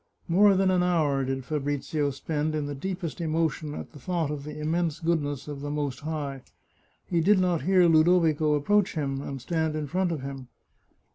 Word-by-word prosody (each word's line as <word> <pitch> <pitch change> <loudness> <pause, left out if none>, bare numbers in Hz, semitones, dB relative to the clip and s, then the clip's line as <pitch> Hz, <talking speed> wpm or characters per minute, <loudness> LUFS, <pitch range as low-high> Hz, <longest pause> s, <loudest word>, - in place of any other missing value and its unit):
More 195 +3 +5
than 190 0 +3
an 180 -1 +3
hour 155 -6 +2
did 135 0 -3
Fabrizio 145 +1 -1
spend 150 +2 -2
in 150 -1 -1
the 145 - -4
deepest 175 +2 -4
emotion 160 -2 -1
at - - -7
the 145 - -12
thought 165 +1 -1
of 145 -1 -5
the 150 0 -7
immense 160 +1 -1
goodness 150 -5 -1
of 145 -2 -6
the 145 - -4
Most 145 -3 -2
High. 145 -3 -4 0.6
He 170 -2 0
did 200 +5 +5
not 180 -3 +1
hear 185 -1 +4
Ludovico 160 -2 +4
approach 195 +7 +2
him 135 -3 -2
and 140 -1 -5
stand 160 +3 -1
in 155 -1 -2
front 180 +4 0
of 155 -5 -3
him. 135 -2 -7
155 Hz, 190 wpm, -27 LUFS, 145-170 Hz, 0.6 s, More